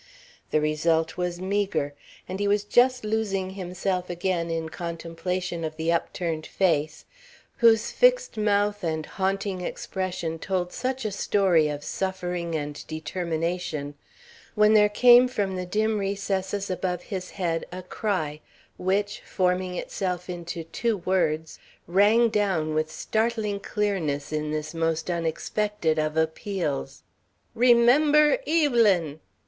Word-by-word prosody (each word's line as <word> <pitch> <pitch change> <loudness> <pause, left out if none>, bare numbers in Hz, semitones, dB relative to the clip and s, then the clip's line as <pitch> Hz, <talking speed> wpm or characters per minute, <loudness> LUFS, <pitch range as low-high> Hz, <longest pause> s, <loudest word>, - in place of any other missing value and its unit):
The 155 - +2
result 160 +2 +1
was 180 -1 -2
meagre, 190 -6 -1 0.3
and 190 +1 -5
he 205 - +1
was 205 0 +2
just 250 +4 +3
losing 200 -3 -1
himself 185 -1 -3
again 175 -1 -1
in 165 -1 -2
contemplation 170 +1 -4
of 155 -1 -4
the 165 +1 0
upturned 165 -1 -2
face, 155 -5 0 0.5
whose 225 -2 +4
fixed - - +3
mouth 205 -1 +1
and 160 -2 -1
haunting 195 -1 -2
expression 180 -3 -4
told 180 0 -2
such 260 0 -3
a 215 - -1
story 190 -5 +2
of 145 -1 -4
suffering 180 -3 -3
and 145 -1 -4
determination, 165 -2 -3 0.6
when 210 0 +5
there 210 -1 +6
came 245 +4 +7
from 205 -6 -2
the 180 -1 -4
dim 215 +3 +1
recesses 195 0 -2
above 180 -1 -2
his 185 -3 -5
head 170 -4 -2
a 180 +1 -7
cry, 180 -7 -2 0.4
which, 200 +3 0
forming 180 -1 0
itself 180 -1 -3
into 170 -1 -5
two 220 +7 -1
words, 160 -4 -1 0.3
rang 205 +6 +4
down 190 -8 0
with 155 0 0
startling 220 +3 -1
clearness 170 -10 -2
in 150 0 -1
this 155 +1 -3
most 165 +1 -1
unexpected 170 +1 -1
of 155 0 -1
appeals: 160 -4 -2 0.5
"Remember 265 - +5
Evelyn!" 225 - +3
185 Hz, 125 wpm, -26 LUFS, 165-205 Hz, 0.6 s, came